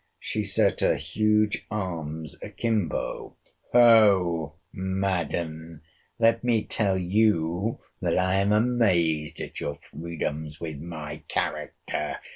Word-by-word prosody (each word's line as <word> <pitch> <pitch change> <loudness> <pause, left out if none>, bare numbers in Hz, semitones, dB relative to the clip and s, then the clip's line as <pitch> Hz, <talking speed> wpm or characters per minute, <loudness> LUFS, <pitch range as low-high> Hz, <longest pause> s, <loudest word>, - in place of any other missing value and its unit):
She 105 - -2
set 100 -1 +2
her - - +3
huge 105 -1 +1
arms 80 -6 -4
akimbo: 110 -8 -2 0.3
Hoh! 100 -10 +5 0.2
Madam, 85 -4 -2 0.4
let 115 0 +3
me 115 -3 +2
tell 100 -4 +1
you 95 +1 +1 0.2
that - - +1
I 95 +1 +2
am 100 +1 +2
amazed 95 -9 +2
at - - -5
your 70 - -3
freedoms 75 -1 -5
with 80 -4 -5
my 75 -2 -6
character! - - -3
95 Hz, 105 wpm, -26 LUFS, 80-105 Hz, 0.4 s, Hoh